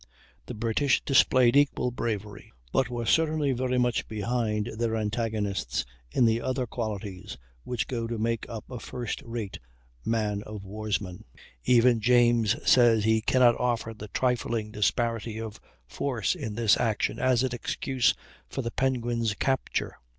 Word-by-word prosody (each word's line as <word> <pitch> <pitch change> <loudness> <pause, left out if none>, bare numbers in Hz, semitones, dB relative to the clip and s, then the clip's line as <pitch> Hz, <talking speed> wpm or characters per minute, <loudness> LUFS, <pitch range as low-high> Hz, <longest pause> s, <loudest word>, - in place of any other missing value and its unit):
The - - -6
British 115 +5 +1
displayed 130 -2 +4
equal 140 -3 +3
bravery, 105 -4 -4 0.2
but 130 -2 +2
were 120 -1 -3
certainly 155 0 +2
very 125 0 0
much 125 -2 +1
behind 110 0 -1
their 115 -1 0
antagonists 105 - -2 0.2
in 120 - +3
the 115 +1 +2
other 130 0 -1
qualities 105 -4 -5 0.3
which 125 -2 -2
go 115 -3 -3
to 115 0 -3
make 115 +1 -2
up 115 -2 -7
a 125 - -5
first 120 -1 -5
rate 115 -4 -5 0.4
man 105 - 0
of 105 -2 -8
warsman. 100 -2 -4 0.4
Even 120 -1 +5
James 120 -2 +4
says 115 -4 +5
he 110 0 +3
"cannot 120 +1 +4
offer 120 -2 -1
the 105 -1 -9
trifling 120 -1 -1
disparity 115 +1 -1
of 110 -1 -6 0.3
force 120 - -1
in 130 - -5
this 115 -2 +3
action 110 -3 0
as 130 -1 +3
an 130 - 0
excuse 125 +1 0 0.3
for 135 - -4
the 115 - -3
Penguin's 120 -4 0
capture. 130 +4 -1
115 Hz, 145 wpm, -27 LUFS, 110-125 Hz, 0.4 s, Even